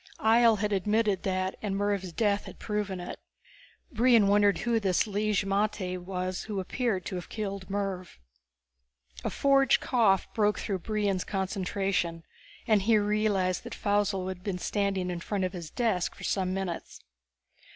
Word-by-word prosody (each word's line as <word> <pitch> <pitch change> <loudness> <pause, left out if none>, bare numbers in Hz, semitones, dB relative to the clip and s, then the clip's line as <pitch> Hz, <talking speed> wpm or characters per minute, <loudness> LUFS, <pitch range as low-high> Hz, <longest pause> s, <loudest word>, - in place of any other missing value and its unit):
Ihjel 225 0 +5
had 210 0 -1
admitted 210 0 +1
that, 185 0 -1
and 200 -2 -2
Mervv's 200 -2 -1
death 205 +2 +1
had - - -10
proven 210 -3 -3
it. 175 - -7 0.7
Brion 235 -3 +5
wondered 205 0 +4
who 235 -1 +1
this 190 -4 +2
Lig 210 0 -1
magte 195 -2 -1
was 185 0 -4
who 210 -3 -3
appeared 195 0 -1
to - - -4
have 175 - -8
killed 200 -3 -5
Mervv. 195 - -3 1.1
A - - 0
forged 275 -1 +3
cough 220 -7 +2
broke 210 -1 +2
through 195 -3 -2
Brion's 205 -2 -1
concentration, 190 -3 -2 0.4
and 215 -3 +3
he 220 +2 +4
realized 205 -3 +1
that - - -7
Faussel 205 -2 0
had 185 -1 -7
been 195 -3 -2
standing 195 -1 -1
in 175 - -4
front 195 +3 -2
of 185 - -1
his 170 -4 -6
desk 220 -6 0
for - - -12
some 185 -2 0
minutes. 185 -3 -4
200 Hz, 155 wpm, -29 LUFS, 185-210 Hz, 1.1 s, Ihjel